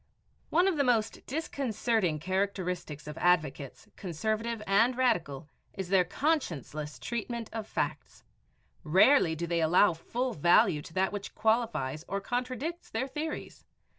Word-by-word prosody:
One 350 +4 +3
of 370 -5 +1
the 285 - +3
most 230 -4 +1
disconcerting 230 - -1
characteristics 180 -3 -2
of 150 +1 -7
advocates, 150 -6 0
conservative 215 +5 -2
and 230 +6 +3
radical, 165 - 0 0.3
is 190 -2 -5
their 190 -1 +5
conscienceless 165 - -2
treatment 235 -1 -4
of 220 -2 -4
facts. - - -4 0.6
Rarely 180 - +5
do 170 +2 -3
they 170 0 0
allow 175 +4 +5
full 240 +10 -3
value 155 -1 +4
to 160 - -12
that 190 0 +2
which 205 -1 -6
qualifies 220 - 0
or 200 +2 -2
contradicts 255 - -4
their 240 +4 -2
theories. 300 +3 -5
200 Hz, 135 wpm, -30 LUFS, 165-245 Hz, 0.6 s, their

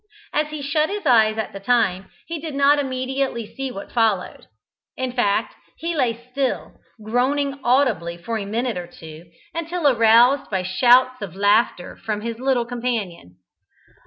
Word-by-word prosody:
As 300 0 +1
he 300 -1 -7
shut 305 +2 +1
his 410 +1 -5
eyes 220 -3 +4
at 220 - -3
the 195 - -7
time, 195 -4 +1 0.2
he 330 -1 -5
did 305 -2 -6
not 280 +1 +4
immediately 260 -2 -2
see 270 +5 -6
what 200 -5 -8
followed. 220 -6 0 0.5
In 260 -1 -2
fact 225 -5 0 0.2
he 335 +1 -3
lay 240 -5 0
still, 270 0 -2 0.3
groaning 275 +5 0
audibly 240 -10 +1
for 220 +6 -4
a 200 - -5
minute 230 +1 -2
or 175 - -7
two, 160 0 -12 0.3
until 335 -1 -1
aroused 240 +2 +5
by 190 -3 -1
shouts 250 +6 +4
of 195 -5 -6
laughter 205 -2 +1
from 210 -1 -4
his 230 +1 -5
little 255 -2 +1
companion. 225 - -4
245 Hz, 160 wpm, -22 LUFS, 210-275 Hz, 0.5 s, aroused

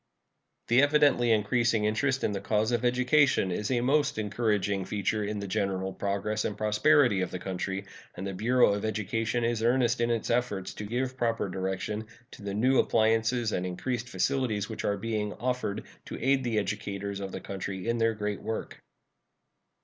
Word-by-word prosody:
The 120 +3 +6
evidently 145 -5 +4
increasing 110 0 +2
interest 130 +5 0
in - - +1
the 100 -1 -3
cause 110 +3 +1
of 120 0 0
education 125 -3 +3
is 105 +4 -2
a 125 -2 +1
most 145 +2 +2
encouraging 105 -2 0
feature 105 +1 -1
in 105 +1 -3
the 100 -1 -4
general 95 -1 -1
progress 100 +2 -2
and 105 - -3
prosperity 110 +1 +3
of 90 - -1
the - - -4
country, 95 +1 -4 0.3
and 95 - -5
the 100 - -3
Bureau 120 +2 +3
of 100 - -3
Education 110 +2 -1
is 115 -1 0
earnest 120 0 +2
in 120 - +2
its 115 -2 -1
efforts 105 -6 -1
to 105 - -6
give 130 +4 -2
proper 115 -4 0
direction 95 +3 -3 0.2
to - - -12
the 100 -1 -4
new 130 +5 +3
appliances 115 +1 +2
and 90 - -1
increased 120 +7 -3
facilities 110 +1 0
which 110 - -6
are 100 - 0
being 105 0 -2
offered 125 -4 -2 0.2
to - - -7
aid 135 +1 +2
the 120 -3 -1
educators 100 -1 -3
of 95 -1 -5
the - - -5
country 95 0 -5
in 115 0 0
their 115 0 +2
great 105 -1 -3
work. 110 - -5
110 Hz, 180 wpm, -28 LUFS, 100-120 Hz, 0.3 s, The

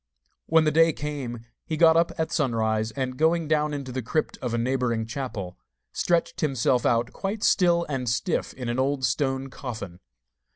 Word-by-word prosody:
When 160 0 +5
the 155 - +2
day 165 +1 +5
came 135 -6 -5 0.2
he 160 - -3
got 160 -1 +6
up 170 +1 +3
at 160 -1 -1
sunrise, 110 -6 0
and 130 +1 -4
going 160 0 +2
down 150 0 +1
into 140 -3 -5
the 130 +1 -3
crypt 155 +7 -1
of 125 - -2
a 120 - 0
neighbouring 120 -2 0
chapel, 110 -7 -5 0.3
stretched 170 -1 0
himself 130 -4 +2
out 120 0 +1
quite 205 +2 -4
still 170 -5 +3
and 130 -4 -2
stiff 120 - -1
in 125 -2 -5
an 120 +2 -1
old 135 0 +1
stone 135 -1 -1
coffin. 110 -10 -7
135 Hz, 175 wpm, -25 LUFS, 120-155 Hz, 0.3 s, got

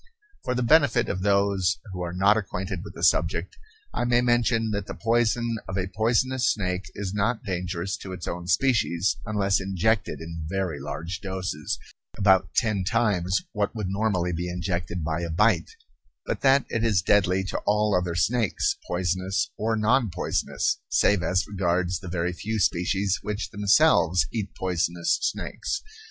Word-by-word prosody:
For 125 - -1
the 125 - 0
benefit 145 0 +4
of 95 - -2
those 100 -2 +2 0.2
who 90 - -5
are 85 -1 -3
not 100 +4 +4
acquainted 95 -3 -3
with - - -10
the - - -7
subject, - - +2 0.4
I - - -1
may 120 0 +3
mention 120 -2 +2
that 100 -1 -3
the - - -6
poison 115 0 +1
of 95 - -4
a 95 0 -2
poisonous 120 +4 +2
snake 90 -3 -2
is 100 -2 -4
not 105 +3 0
dangerous 90 -1 -3
to 95 - -8
its 90 -2 -6
own 85 0 -5
species 100 -2 +2
unless 100 -2 +1
injected 95 +3 0
in 80 -1 -6
very 95 -5 -2
large 90 +3 -5
doses, 95 -6 -3 0.4
about 95 -2 +4
ten 105 -4 +1
times 95 -3 +1
what 105 +2 -2
would 105 -4 -3
normally 95 -3 0
be 90 +2 -3
injected 90 -1 -3
by 80 +2 -1
a 85 - -3
bite; 90 0 +2 0.6
but - - -3
that 135 -1 +4
it 115 - -1
is 105 -6 +2
deadly 95 -1 +3
to 95 - -3
all 105 0 +3
other 90 -2 0
snakes, 110 +5 +1
poisonous 90 +1 -1
or 110 +1 0
non 115 +2 +2
poisonous, 85 - -1
save 100 -3 +3
as 90 +3 +1
regards 90 -2 0
the 95 - -10
very 90 0 -1
few 110 +5 -3
species 95 +1 +1
which 105 0 -4
themselves 100 - +4
eat 105 -4 -4
poisonous 85 -2 0
snakes. 395 - -3
95 Hz, 165 wpm, -25 LUFS, 90-110 Hz, 0.6 s, benefit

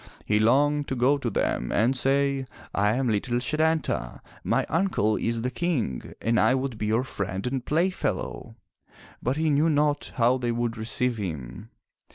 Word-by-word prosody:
He 105 0 +2
longed 145 +6 +3
to 130 - -2
go 130 +4 +3
to - - -2
them 60 - -1
and 120 +6 +2
say, 135 0 +1 0.3
"I 105 +2 +2
am 130 0 0
little 115 +2 0
Setanta. 155 +1 -1 0.2
My - - +1
uncle 160 - +1
is 115 +1 -1
the 125 - -1
King 130 - -2
and 115 -1 +1
I 130 - +4
would 130 -4 -3
be 105 - -1
your 110 +4 +2
friend 100 -6 -4
and 125 0 -2
playfellow!'* 175 +7 -1 0.7
But 130 +4 -1
he 160 -1 +1
knew 150 +3 +3
not 145 -1 +1
how 125 +2 +3
they 120 -1 -1
would 120 0 -1
receive 115 +2 0
him. 75 - -6
125 Hz, 170 wpm, -26 LUFS, 110-145 Hz, 0.7 s, I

